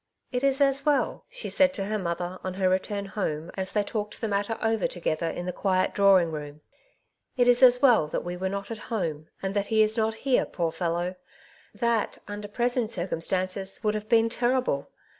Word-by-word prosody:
'^ - - -57 0.3
It 250 0 -2
is 275 0 +3
as 275 -1 +3
well," 295 -2 0
she - - -2
said 280 -1 +3
to 195 - -2
her 215 +1 -2
mother, 175 0 -3
on 185 -1 -4
her 190 -1 +1
re 185 0 +3
turn 200 +1 -5
home, 170 -5 -3
as 190 -1 -3
they 210 - +1
talked 210 0 -4
the 225 - -2
matter 205 +2 -1
over 225 -2 +1
together 165 -1 -2
in 175 - -4
the 180 - -3
quiet 185 -1 0
drawing 190 -4 +4
room, 150 -1 -7 0.4
— - - -48
"it 245 -1 +3
is 245 +1 +5
as 250 0 +7
well 235 - +5
that - - -3
we 175 0 -4
were 190 +1 -2
not 200 +2 -5
at 225 - -5
home, 160 -8 -3 0.2
and 190 0 -2
that 200 0 0
he 220 -1 +4
is 215 +2 +2
not 220 0 +1
here, 265 -2 +3
poor 170 -2 -2
fellow! 175 +2 -2 0.6
That, 230 0 0
under 205 0 -6
present 240 +1 0
circumstances, 185 +1 -1
would 210 -1 +1
have 215 0 -5
been 230 -1 +4
terrible. 240 - 0
200 Hz, 215 wpm, -26 LUFS, 180-230 Hz, 0.6 s, as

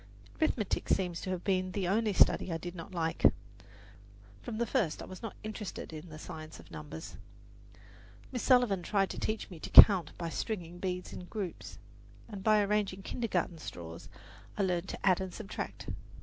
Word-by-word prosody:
Arithmetic 225 -10 0
seems 180 -3 +1
to 185 - -5
have 185 -1 -2
been 185 -2 0
the 195 -3 -1
only 215 +3 +2
study 190 - +4
I 165 - 0
did 175 +1 -6
not 170 +1 -8
like. 165 -3 -2 1.2
From 235 -3 -5
the 235 - +1
first 220 - 0
I - - -6
was 185 - -10
not 225 -3 -6
interested 210 -6 -6
in 155 +2 -8
the 155 - -9
science 155 0 -8
of - - -15
numbers. 150 +2 -8 1.1
Miss 250 -3 -2
Sullivan 245 -8 +4
tried 195 +1 +1
to - - -5
teach 215 -2 -2
me 170 - -9
to - - -6
count 185 -7 +9
by 170 -1 -3
stringing 175 -2 -4
beads 180 -1 -3
in 180 - -7
groups, 195 -2 -6 0.5
and 205 -4 -8
by 215 -1 +5
arranging 200 -2 0
kintergarten 185 -8 -2
straws 85 - -8 0.5
I 205 - +2
learned 180 -1 0
to - - -5
add 185 -1 +4
and 190 -1 -4
subtract. 215 +2 -6
185 Hz, 180 wpm, -32 LUFS, 170-210 Hz, 1.2 s, count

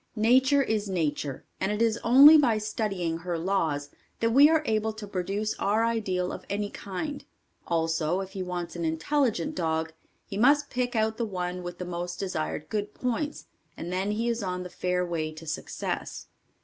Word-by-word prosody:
Nature 260 +5 +4
is 215 -4 -1
nature, 150 -6 -2
and 190 - 0
it 210 - -2
is 230 0 +2
only 275 +6 +9
by 255 -8 +4
studying 200 -6 -2
her 175 0 -3
laws 160 -5 -1 0.3
that 230 0 +2
we 280 +5 +7
are 320 -1 +3
able 220 0 +1
to 215 -1 -8
produce 200 +2 -2
our 215 +3 +2
ideal 190 -6 -1
of - - -7
any 205 0 -2
kind; 280 +10 -5 0.4
also, 165 +1 0
if 190 -1 -5
he 195 - -5
wants 180 -1 -4
an 170 - -3
intelligent 175 - 0
dog, 160 -2 -1 0.3
he 195 - -6
must 285 +5 +4
pick 250 -1 -1
out 220 0 +1
the 235 - -1
one 180 -4 -3
with 175 0 -6
the 180 - -5
most 175 0 -4
desired 155 -5 -3
good 210 -1 -3
points, 290 +5 -2 0.3
and 175 +2 -5
then 190 +2 0
he 220 +3 -1
is 235 0 0
on 180 -2 -3
the 180 - -7
fair 180 0 -1
way 160 -3 -2
to 155 +1 -11
success. 155 - -4
195 Hz, 185 wpm, -27 LUFS, 175-230 Hz, 0.4 s, only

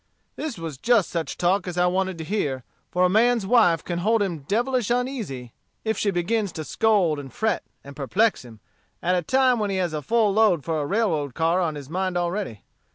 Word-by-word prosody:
"This 310 -9 -5
was 160 -5 -6
just 230 -3 +2
such 165 -2 -3
talk 185 +2 +1
as 180 -1 -5
I 180 - +3
wanted 185 0 0
to 160 - -5
hear, 150 - -2 0.3
for 180 - +1
a - - +6
man's 225 +3 +3
wife 190 -7 +4
can 175 -1 -3
hold 215 +3 +2
him 175 -5 -3
devilish 235 - 0
uneasy 235 - -3 0.3
if 220 0 +1
she 205 - 0
begins 195 +3 0
to 155 - -5
scold 190 -5 +2
and 135 -2 -9
fret, 220 -4 0 0.2
and 140 0 -11
perplex 195 - +1
him, 115 -4 -14 0.4
at 180 - +2
a 180 - +2
time 255 +6 +2
when 210 -1 -1
he 195 - -1
has 175 -3 -1
a 155 - -2
full 220 +3 +2
load 200 -8 +3
for 160 0 -1
a 145 - -3
railroad 165 - 0
car 165 +3 +2
on 160 -4 -1
his 145 -2 -8
mind 185 +3 -2
already. 175 - -3
185 Hz, 215 wpm, -24 LUFS, 160-220 Hz, 0.4 s, a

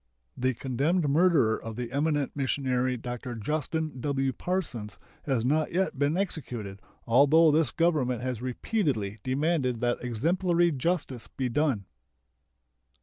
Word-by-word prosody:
The 130 0 0
condemned 145 +7 0
murderer 145 -7 +3
of 115 -1 -6
the 120 0 -5
eminent 145 0 0
missionary 130 -2 0
Dr. 120 +1 -6
Justin 150 +4 -2
W. 135 -1 0
Parsons 135 - -3 0.3
has 130 -5 0
not 155 +4 +1
yet 185 -6 0
been 145 +4 +2
executed, 120 - -4 0.3
although 145 +7 +5
this 155 -2 +3
Government 145 -8 +1
has 125 -3 -3
repeatedly 125 - -1
demanded 130 -1 0
that 120 0 0
exemplary 170 - +1
justice 145 -4 -2
be 130 -2 -3
done. 130 -6 0
135 Hz, 125 wpm, -28 LUFS, 125-160 Hz, 0.3 s, although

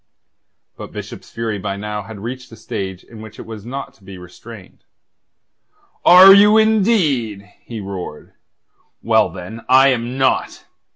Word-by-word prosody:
But - - -10
Bishop's - - -10
fury 115 -2 -4
had - - -10
by 100 -1 -4
now 105 +1 -6
reached 120 +5 -8
a - - -11
stage 95 -4 -7
in 115 -2 -14
which 110 -1 -12
it - - -10
was 110 -1 -10
not 135 +3 -7
to 100 - -27
be 95 0 -11
restrained. 90 +3 -14 1.2
"Are 185 +2 +9
you, 210 +2 +6
indeed?" 190 - +1 0.2
he 115 -2 -9
roared. 95 -6 -8 0.7
"Well, - - +2
then, 110 +6 -10
I 135 +2 +6
am 125 0 -2
not. 130 -1 -1
115 Hz, 150 wpm, -18 LUFS, 100-135 Hz, 1.2 s, Are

